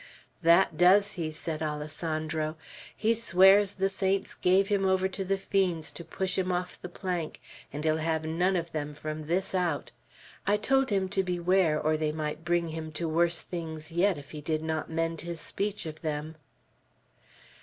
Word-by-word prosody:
"That 170 0 +5
does 200 +3 +5
he!" 165 -5 -3
said 155 0 -5
Alessandro. 155 +1 -2 0.4
"He 225 +1 +3
swears 200 -2 +5
the 195 0 +1
saints 195 0 0
gave 190 +2 +3
him 200 -1 +1
over 190 0 +3
to 190 +1 -4
the 195 +1 0
fiends 185 -5 0
to 170 - -8
push 185 +3 -2
him 185 0 0
off 180 0 -3
the 180 - -6
plank, 175 -3 -4 0.3
and 145 +2 -5
he'll 155 0 +3
have 160 0 -1
none 175 +4 +1
of 170 -1 -2
them 150 -1 -4
from 155 0 -5
this 185 +4 0
out! 175 -6 -1 0.6
I 205 +1 +4
told 270 +5 +2
him 195 -2 +1
to 195 0 +1
beware, 180 -3 +2
or 155 +1 +1
they 155 -1 0
might 155 0 -4
bring 170 -1 +1
him 160 0 -5
to 165 +1 -2
worse 170 +1 +1
things 160 -2 -6
yet 180 +1 +2
if 140 -1 -11
he 150 - -7
did 155 +1 -1
not 160 0 -2
mend 165 0 -1
his 170 -1 -5
speech 205 +1 -3
of 155 -1 -7
them." 155 0 -3
170 Hz, 180 wpm, -29 LUFS, 155-190 Hz, 0.6 s, That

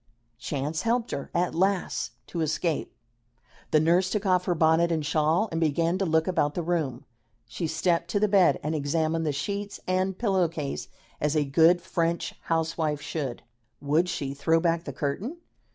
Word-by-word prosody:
Chance 150 +2 -2
helped 235 +1 0
her, 140 - -4
at 175 0 0
last, 190 +2 0
to 170 - -4
escape. 155 +1 -1 0.8
The 155 - +4
nurse 175 +4 +3
took 210 +1 -2
off 180 -1 +2
her 175 - +1
bonnet 160 +1 +3
and 160 -3 0
shawl 155 +7 +2
and 165 0 -2
began 165 +3 +1
to 195 - 0
look 160 0 +2
about 150 -5 0
the 175 - -1
room. 155 -8 -2 0.4
She 125 +9 -3
stepped 170 +2 0
to 205 - +1
the 210 - +3
bed 195 -3 +4
and 155 +2 -1
examined 160 +2 0
the - - +2
sheets 200 +8 -4
and 185 +1 0
pillow 190 -6 +2
case 155 -4 -5 0.3
as 150 +1 +1
a 150 -1 +2
good 165 +5 +4
French 170 -2 -1
housewife 160 -2 0
should. 140 -4 -4 0.4
Would 155 +5 +1
she 140 -5 -3
throw 160 +4 +2
back 170 0 0
the 140 - -5
curtain? 155 - -3
165 Hz, 175 wpm, -27 LUFS, 150-180 Hz, 0.8 s, The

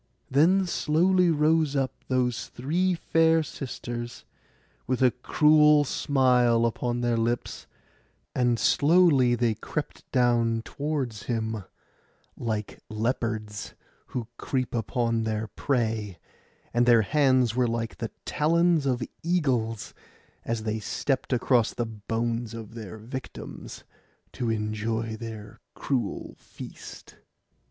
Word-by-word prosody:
Then 175 +8 +4
slowly 180 +2 +2
rose 155 -1 +2
up 135 -1 0
those 125 -2 0
three 175 +9 0
fair 165 -1 +3
sisters, 120 -4 -6 0.6
with 130 0 +1
a 125 - +6
cruel 150 +3 +5
smile 125 -5 +3
upon 120 +1 -1
their 120 -1 +1
lips; 115 +1 -2 0.7
and 120 -2 +2
slowly 145 -4 +4
they 120 -1 +1
crept - - -6
down 115 -2 +2
towards 140 -8 -3
him, 110 -4 -2 0.7
like 110 -3 -4
leopards 110 -1 -3 0.3
who 120 -3 -4
creep 130 -2 -2
upon 115 0 0
their 110 0 -2
prey; 110 -4 -1 0.6
and 120 0 +3
their 115 -2 +6
hands 130 -2 +3
were 125 -1 +2
like 115 -1 -3
the 115 - -4 0.2
talons 165 0 +2
of 125 -2 0 0.2
eagles 130 - 0 0.5
as 115 -1 -2
they 110 0 -2
stept 130 +6 -2
across 120 -2 +2
the 120 - -1
bones 115 +1 -3
of 110 -1 -8
their 110 -2 -8
victims 125 +4 -8 0.5
to 120 - -3
enjoy 110 +1 -2
their 110 -2 -8 0.2
cruel 125 -7 -2
feast. - - -11
120 Hz, 115 wpm, -27 LUFS, 115-140 Hz, 0.7 s, a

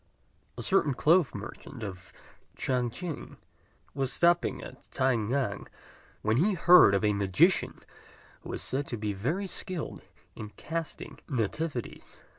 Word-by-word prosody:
A - - -5
certain 155 -8 +2
cloth 160 -2 +3
merchant 115 +4 -8
of 95 -3 -7 0.5
Ch'ang 125 -2 0
ch'ing 170 +5 -7 0.6
was 135 -1 -1
stopping 175 0 +2
at - - -11
T'ai 130 -1 +2
ngan, 115 -1 -1 0.6
when 110 +2 +2
he 195 +7 +3
heard 175 - +7
of 100 - 0
a 105 - +3
magician 100 - +2 0.6
who - - -11
was - - -3
said 140 +2 -1
to 120 - -3
be 105 -1 -2
very 150 - -2
skilled 185 -2 -5 0.3
in 105 -1 -7
casting 165 0 -5
nativities. 130 +1 -3
130 Hz, 135 wpm, -29 LUFS, 110-165 Hz, 0.6 s, heard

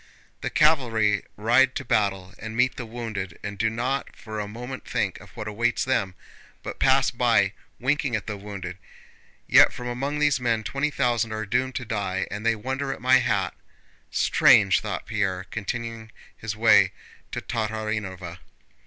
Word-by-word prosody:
"The - - -2
cavalry 115 -9 +3
ride 120 +5 +4
to - - -4
battle 100 -4 0
and 110 +1 -6
meet 125 +1 +3
the 120 - -6
wounded 110 -6 -5
and 100 0 -4
do 110 +3 +1
not 125 +5 -2
for 110 -1 -7
a 105 - -3
moment 125 +5 -7
think - - -2
of - - -14
what 110 - -5
awaits 115 +4 0
them, 100 -8 0 0.5
but - - -6
pass 135 0 +4
by, 115 -5 +2 0.3
winking 135 -1 +1
at 105 - -3
the 105 - -4
wounded. 95 -3 -7 0.7
Yet - - +7
from 125 - -7
among 135 +4 -2
these 150 -2 +2
men 115 -3 0
twenty 135 +6 -1
thousand 120 -5 0
are 110 0 -3
doomed 130 +5 0
to 125 - -3
die, 100 -4 -2
and 105 +2 -5
they 115 0 +3
wonder 130 +5 -3
at - - -5
my 130 +1 +5
hat! 100 -7 0 0.6
Strange!" - - +5
thought - - -4
Pierre, 95 -4 -1
continuing 115 +1 -5 0.2
his 110 -1 -5
way 115 0 +5 0.4
to - - -3
Tatárinova. 105 -6 -4
115 Hz, 165 wpm, -25 LUFS, 105-125 Hz, 0.7 s, Yet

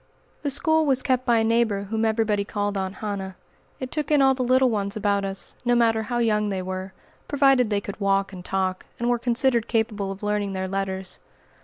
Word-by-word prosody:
The 290 - -1
school 315 +3 +2
was 260 -2 +3
kept 255 -1 0
by 235 -1 +4
a 225 - +3
neighbor 225 -3 +1
whom 220 +2 -1
everybody 220 -2 +1
called 205 0 -2
"Aunt 190 0 -3
Hannah." 195 -2 -4 0.4
It 260 -1 -5
took 300 -2 -2
in 300 -1 +4
all 270 -1 +5
the 260 - -4
little 255 0 +3
ones 200 -1 -2
about 200 -1 +1
us, 195 0 -3
no 245 0 +2
matter 225 -2 +3
how 240 +2 -3
young 210 -3 +1
they 190 -2 -2
were, 185 +1 -5 0.4
provided 270 -4 +3
they 205 -1 0
could 200 0 -7
walk 195 -1 +1
and 180 -1 -8
talk, 185 0 -2
and 240 +1 0
were 240 - +1
considered 240 0 +1
capable 215 -3 -1
of 195 +1 -9
learning 205 -1 -1
their 190 0 -2
letters. 190 0 -3
215 Hz, 210 wpm, -24 LUFS, 195-245 Hz, 0.4 s, all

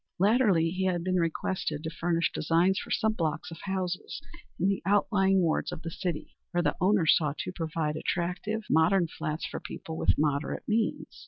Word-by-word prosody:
Latterly 195 -5 +3
he 190 +1 -1
had 175 -2 0
been 185 0 +1
requested 165 -2 -1
to 160 - -3
furnish 170 0 0
designs 170 +5 +2
for - - -8
some 220 -1 +1
blocks 160 -5 -2
of 165 - -9
houses 185 -2 -3 0.4
in 185 - +2
the 195 -1 0
outlying 195 -1 +3
wards 165 -3 0
of 160 - -7
the 165 - -4
city, 170 -2 -4
where 175 -1 0
the - - +1
owners 185 -3 +5
sought 150 -2 0
to - - -4
provide 160 -3 -2
attractive, 180 +7 -2
modern 170 +3 +3
flats 155 0 -4
for - - -5
people 160 - -7
with - - +2
moderate 145 0 0
means. 220 +1 -1
175 Hz, 180 wpm, -29 LUFS, 160-190 Hz, 0.4 s, owners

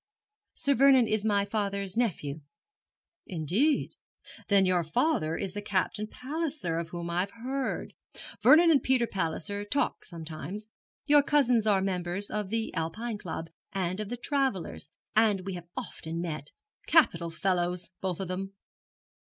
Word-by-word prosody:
'Sir 280 - +2
Vernon 265 -2 +6
is 215 -1 0
my 205 -2 +2
father's 200 -2 -2
nephew.' 160 -11 -1 0.9
'Indeed! 190 - +1 0.6
Then 200 -2 +5
your 180 -2 +2
father 165 - +1
is 195 -2 -3
the 205 - -4
Captain 205 +1 -1
Palliser 275 - -3
of 165 -1 -5
whom 170 0 -5
I've 180 +3 0
heard 255 +5 -3 0.5
Vernon 330 +2 +7
and 285 - +5
Peter 260 -2 +3
Palliser 195 0 -3
talk 230 +8 -1
sometimes. 170 +5 -7 0.4
Your 290 -1 +6
cousins 250 -6 +3
are 195 -2 +4
members 185 +1 -2
of 210 -2 -2
the 225 +1 -2
Alpine 205 +7 -3
Club, 165 -3 -6 0.2
and 185 0 -1
of 210 -1 -4
the 245 - -3
Travellers', 250 - -1 0.3
and 215 -3 +4
we 195 - -3
have 175 -1 -7
often 160 +1 -5
met. 155 -4 -4 0.4
Capital 170 - +4
fellows, 175 +1 -1
both 185 -3 -2
of 190 - -3
them.' 195 +2 -4
200 Hz, 145 wpm, -29 LUFS, 175-235 Hz, 0.9 s, Vernon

